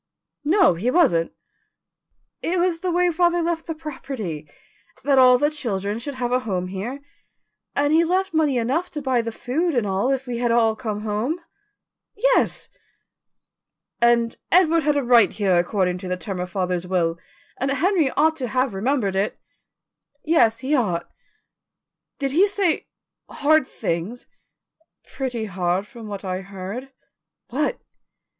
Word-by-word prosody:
"No, 345 - +4
he 190 +9 -1
wasn't." 250 - +3 1.1
"It 355 +2 -1
was 345 -1 +1
the 365 - -2
way 355 0 +2
father 345 +1 +2
left 335 0 -2
the 325 - -3
property 260 - -6 0.5
that 275 0 +4
all 250 -1 +7
the 295 +4 +1
children 210 -7 -3
should 280 +3 -5
have 245 -1 -2
a 250 - +3
home 185 -7 -3
here 220 +9 -5 0.7
and 290 +1 +2
he 330 +1 +5
left 375 +3 0
money 305 -5 +2
enough 275 +10 0
to 300 - -4
buy 260 -3 +2
the 230 0 -4
food 300 +8 -1
and 240 -3 +1
all 195 +5 0
if 270 -1 -1
we 240 -2 -4
had 240 -1 +1
all 225 -2 +3
come 215 -4 -4
home." 220 +10 -2 0.8
"Yes." - - +2 1.3
"And 235 -1 +3
Edward 335 -2 +5
had 295 -1 +1
a 285 - +1
right 235 -5 +5
here 195 -4 +1
according 180 0 +1
to 185 - -7
the 180 0 -2
terms 180 +1 -5
of 180 - -4
father's 180 -2 -2
will, 170 -2 0 0.4
and 270 - 0
Henry 320 +2 +2
ought 315 +2 +4
to 255 -4 -3
have 255 -1 0
remembered 205 -1 0
it." 195 +2 0 0.9
"Yes, 230 -8 +3
he 270 +3 -1
ought." 205 - 0 1.1
"Did 275 -1 -2
he 360 +8 +4
say 395 -5 0 0.4
hard 305 -1 +2
things?" 195 +3 -4 0.9
"Pretty 245 -5 -3
hard 185 -1 -1
from 230 -1 -11
what 200 -1 -6
I 185 0 -2
heard." 195 +7 -7 0.6
"What?" 290 +5 -1
250 Hz, 155 wpm, -23 LUFS, 200-305 Hz, 1.3 s, all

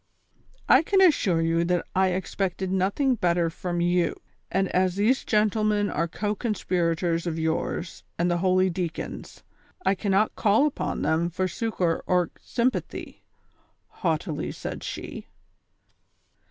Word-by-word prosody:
" - - -32
I - - +3
can 385 +4 +2
assure 240 - +4
you 165 +1 +2
that 175 0 0
I 190 0 +4
expected 185 0 -2
nothing 200 +9 +1
better 175 -6 +1
from 175 0 -3
you, 175 0 +2 0.3
and 195 +1 +1
as 185 -1 +1
these 220 +7 +2
gentlemen 210 -1 +1
are 170 +2 0
co 205 +5 -2
conspirators 175 -6 -1
of 165 -1 -2
yours 160 +2 -2
and 170 - +1
the 175 - +1
holy 185 0 +3
deacon's, 170 -1 -5 0.4
I - - +4
cannot 200 +2 +1
call 215 +7 +3
upon 300 - -2
them 165 +2 +1
for 185 +2 -1
succor 180 -3 -1
or 180 -2 +2
symi)athy," 250 +1 -2 0.7
haughtily 160 -2 -2
said - - -6
she. - - -6
185 Hz, 135 wpm, -26 LUFS, 170-205 Hz, 0.7 s, assure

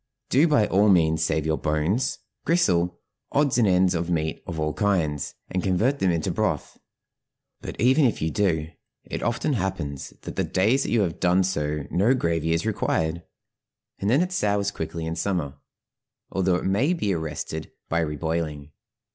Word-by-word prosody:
Do 145 +6 +5
by 130 -9 +4
all 105 +2 +3
means 80 -4 +3
save 80 -1 0
your 80 0 0
bones, 80 +10 0 0.3
gristle, 90 - +2 0.3
odds 140 -3 +2
and 110 - +4
ends 90 -1 +4
of 85 0 -2
meat 80 -2 -1
of 85 -3 -4
all 75 -1 0
kinds, 80 -6 0 0.2
and 95 - 0
convert 110 +11 +1
them 95 - +2
into 85 -2 0
broth; - - -2 0.8
but - - -7
even 130 +6 +4
if 120 - +1
you 80 0 -1
do, 80 -6 0 0.3
it - - -5
often 120 +6 0
happens 90 - -3
that - - -8
the - - +2
days 115 +9 +2
you 115 - +2
have 90 -3 -1
done 90 +1 +3
so 75 -5 -1
no 105 +9 +3
gravy 85 - 0
is 85 +4 0
required, 85 -6 0 0.8
and 100 - 0
then 135 +9 +4
it 180 - -4
sours 100 - +1
quickly 80 -2 -5
in 80 0 -3
summer, 80 -5 -2 0.7
although 95 -1 +1
it - - -2
may 110 - +2
be 105 - 0
arrested 80 -1 -4 0.2
by 85 - 0
reboiling. 75 -1 -3
90 Hz, 170 wpm, -25 LUFS, 80-105 Hz, 0.8 s, Do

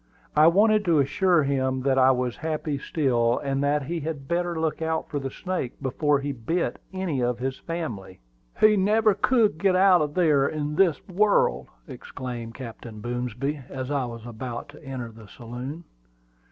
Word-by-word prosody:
I 155 +1 +7
wanted 210 +4 +4
to 170 -3 +3
assure 155 +4 +3
him 130 -2 0
that 135 -1 +2
I 130 0 +6
was 125 -2 0
happy 155 -2 -3
still, 125 -6 +1
and 135 -1 -1
that 145 0 +1
he 165 +5 -3
had 145 -3 -5
better 170 0 -1
look 160 0 -1
out 160 0 -1
for 145 - -1
the 135 -1 -4
snake 180 -4 -4
before 145 +2 +1
he 145 +1 -2
bit 140 +8 -2
any 185 -8 -2
of 120 0 0
his 130 +2 -3
family. 120 - -5 0.4
"He 215 0 +6
never 215 +2 +3
could 210 -3 +2
get 190 0 +3
out 185 -2 +5
of 150 -1 -2
there 150 -6 +3
in 150 -1 -3
this 175 0 +2
world!" 205 +2 +2 0.2
exclaimed 125 -3 -7
Captain 115 -3 -9
Boomsby, 125 +5 -3
as 130 0 -5
I 140 -3 0
was 115 -1 -8
about 120 +1 -6
to 145 +2 -14
enter 130 -4 -6
the 110 -1 -14
saloon. 125 - -7
145 Hz, 175 wpm, -25 LUFS, 125-170 Hz, 0.4 s, I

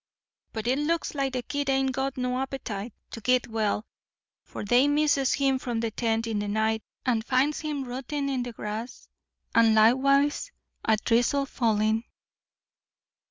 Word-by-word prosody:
"But 220 -1 -5
it 255 +3 +1
looks 330 +3 0
like 275 -2 -1
the 250 -1 -2
kid 285 +2 -2
ain't 270 0 +2
got 265 +1 -2
no 250 0 -1
appetite 245 -5 -4 0.2
to 225 - -7
git 250 +2 +2
well, 220 -1 -1 0.6
for - - -7
they 245 +6 +4
misses 290 -3 +2
him 270 -2 +2
from 240 -3 -3
the 225 -1 -1
tent 225 0 0
in 220 -2 -1
the 205 - -2
night 220 +1 0 0.2
and 235 -4 +1
finds 265 +5 +1
him 300 -3 -3
rootin' 270 +3 -3
in 265 -2 -1
the 245 0 -4
grass, 220 +2 -6 0.5
and 225 -1 +5
likewise 275 - +3 0.3
a 220 -1 +3
drizzle 245 +5 +2
fallin'. 220 -3 +1
250 Hz, 160 wpm, -27 LUFS, 225-275 Hz, 0.6 s, and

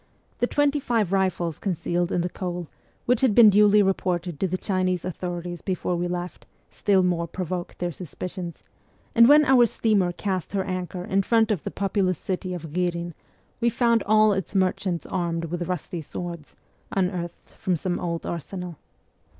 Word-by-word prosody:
The 245 - +2
twenty 290 +1 +2
five 225 -8 0
rifles 180 -4 0
concealed 175 -2 -1
in 175 - +1
the 175 - -1
coal, 175 -2 -4 0.4
which 245 -1 +2
had 255 -6 +3
been 225 -3 +9
duly 210 +1 +6
reported 180 -4 -1
to 190 - +1
the 185 +1 -2
Chinese 185 -2 -1
authorities 175 -1 -4
before 185 -1 -2
w 175 0 -1
r - - -5
e - - -2
left, 180 - -12 0.2
still 195 -2 +2
more 170 -2 0
provoked 180 +1 -4
their 175 0 -2
suspicions; 175 +1 -7 0.5
and 235 +1 +7
when 300 +1 +7
our 255 -4 +6
steamer 205 -6 +1
cast 185 0 -3
her 195 -1 +1
anchor 185 -1 -4
in 195 +1 +2
front 225 +2 +3
of 195 -7 -1
the - - -3
populous 195 -2 0
city 185 +1 -3
of 160 -3 -8
Ghirin 175 -1 -1 0.5
we 235 0 +3
found 235 -1 +2
all 215 0 +5
its 190 0 -4
merchants 185 -2 0
armed 170 -1 -2
with 175 +1 -4
rusty 180 -1 -3
swords, 170 0 -7 0.4
unearthed 180 -3 -2
from 185 - -1
some 175 +2 -2
old 170 -1 -3
arsenal. 175 0 -5
185 Hz, 175 wpm, -25 LUFS, 175-200 Hz, 0.5 s, been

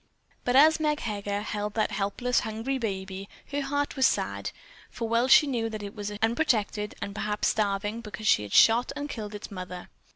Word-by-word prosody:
But 245 - +1
as 310 +4 +7
Meg 300 -1 0
Heger 205 -2 -3
held 210 -1 -3
that 215 - +1
helpless, 210 +5 0
hungry 225 +4 -3
baby 195 -3 -4 0.2
her 285 0 -1
heart 285 +1 -1
was 265 -2 +5
sad, - - -2 0.4
for 230 - -4
well 230 +2 +2
she 295 - +7
knew 235 -5 -1
that 215 -1 -6
it 200 0 -6
was 205 -1 -5
unprotected 225 -4 +1
and 200 - -5
perhaps 210 0 0
starving 205 +1 -1
because 215 -1 -8
she - - +5
had 105 -1 -7
shot 230 +2 +5
and 290 0 -4
killed 215 -6 -6
its 210 - -8
mother. 180 -2 -7
220 Hz, 190 wpm, -27 LUFS, 205-250 Hz, 0.4 s, as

